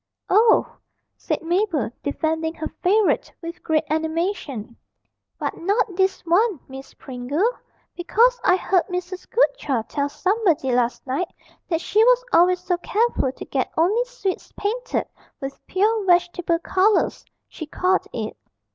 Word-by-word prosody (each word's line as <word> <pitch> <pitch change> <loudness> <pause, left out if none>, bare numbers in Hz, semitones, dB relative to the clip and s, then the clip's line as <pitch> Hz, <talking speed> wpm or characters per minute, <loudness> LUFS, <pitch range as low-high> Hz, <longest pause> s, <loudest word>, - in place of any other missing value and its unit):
'Oh,' 440 +4 +4 0.4
said - - -3
Mabel, 340 - 0
defending 320 +2 -1
her 315 - -4
favourite 410 +2 +2
with 335 +1 -8
great 315 -2 +1
animation, 315 - -2 0.6
'but - - -3
not 400 +2 0
this 380 +1 +1
one, 370 +1 +2
Miss 265 0 -11
Pringle. 270 - -2 0.5
Because 465 +8 +2
I 365 - +5
heard 370 -1 +1
Mrs. 360 0 -5
Goodchild 300 - +1
tell 285 0 -1
somebody 370 - +1
last 240 -1 0
night 275 +7 -2 0.4
that 330 -2 0
she 430 +4 +3
was - - +4
always 360 +1 +5
so 360 -1 0
careful 415 - 0
to - - -10
get 265 -2 -2
only 395 +9 +3
sweets - - -4
painted 475 +5 -2 0.3
with 270 -2 -7
"pure 425 +3 +1
vegetable 350 -1 +2
colours," 380 +5 +1 0.2
she 315 - -8
called 365 +4 +1
it. - - -4
355 Hz, 135 wpm, -22 LUFS, 310-410 Hz, 0.6 s, I